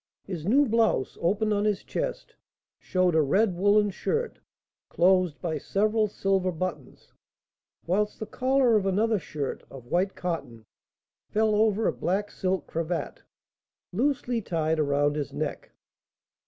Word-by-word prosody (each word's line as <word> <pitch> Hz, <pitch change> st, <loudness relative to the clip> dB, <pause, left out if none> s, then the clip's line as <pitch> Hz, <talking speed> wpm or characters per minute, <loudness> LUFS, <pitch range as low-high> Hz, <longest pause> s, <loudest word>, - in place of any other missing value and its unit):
His 175 Hz, -4 st, -6 dB
new 280 Hz, +7 st, +5 dB
blouse, 225 Hz, -, +1 dB
open 210 Hz, +5 st, +1 dB
on 205 Hz, 0 st, +1 dB
his 210 Hz, -2 st, 0 dB
chest, -, -, -4 dB, 0.5 s
showed 185 Hz, -1 st, +1 dB
a 160 Hz, -, +4 dB
red 190 Hz, +8 st, +2 dB
woollen 205 Hz, +2 st, +3 dB
shirt, 460 Hz, -, -2 dB, 0.5 s
closed 180 Hz, -3 st, +3 dB
by 160 Hz, -3 st, -2 dB
several 215 Hz, +6 st, +1 dB
silver 195 Hz, -2 st, 0 dB
buttons; 160 Hz, -5 st, -6 dB, 0.7 s
whilst 210 Hz, +5 st, 0 dB
the 220 Hz, -, -4 dB
collar 255 Hz, 0 st, +2 dB
of 200 Hz, -2 st, +2 dB
another 215 Hz, +3 st, +2 dB
shirt, 150 Hz, -4 st, -5 dB
of 130 Hz, -3 st, -11 dB
white 185 Hz, +3 st, +1 dB
cotton, 140 Hz, -11 st, -5 dB, 0.6 s
fell 215 Hz, 0 st, +2 dB
over 215 Hz, 0 st, +2 dB
a -, -, +2 dB
black 200 Hz, +4 st, -1 dB
silk 185 Hz, -4 st, -1 dB
cravat, 165 Hz, +1 st, -3 dB, 0.7 s
loosely 250 Hz, +1 st, 0 dB
tied 160 Hz, -4 st, -1 dB
around 145 Hz, 0 st, +2 dB
his 145 Hz, -4 st, -4 dB
neck. -, -, -4 dB
190 Hz, 135 wpm, -27 LUFS, 165-215 Hz, 0.7 s, new